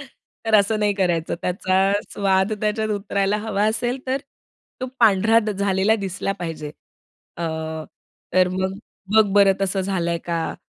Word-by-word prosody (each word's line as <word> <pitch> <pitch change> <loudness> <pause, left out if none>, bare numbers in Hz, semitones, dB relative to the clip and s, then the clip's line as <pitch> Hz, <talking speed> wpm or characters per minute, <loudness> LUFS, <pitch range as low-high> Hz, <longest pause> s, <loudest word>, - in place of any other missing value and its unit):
तर 240 -4 -6
असं 215 +1 +4
नाही 210 -1 +2
करायचं, 175 -4 0
त्याचा 190 +1 +1 0.2
स्वाद 190 0 +1
त्याच्यात 215 +1 0
उतरायला 200 0 0
हवा 210 -1 -1
असेल, 240 +3 -1
तर 260 - +1 0.6
तो 255 - -2
पांढरा 220 0 +5
झालेला 200 +1 +2
दिसला 195 -1 -3
पाहिजे. 160 -3 -5 0.7
अ, 170 - -3 0.9
तर 185 0 +5
मग, 190 +1 -2 0.4
बघ 220 0 +7
बरं 200 -1 +6
तसं 195 0 0
झालंय 175 -3 -1
का? 170 -1 -2
195 Hz, 135 wpm, -22 LUFS, 185-215 Hz, 0.9 s, बघ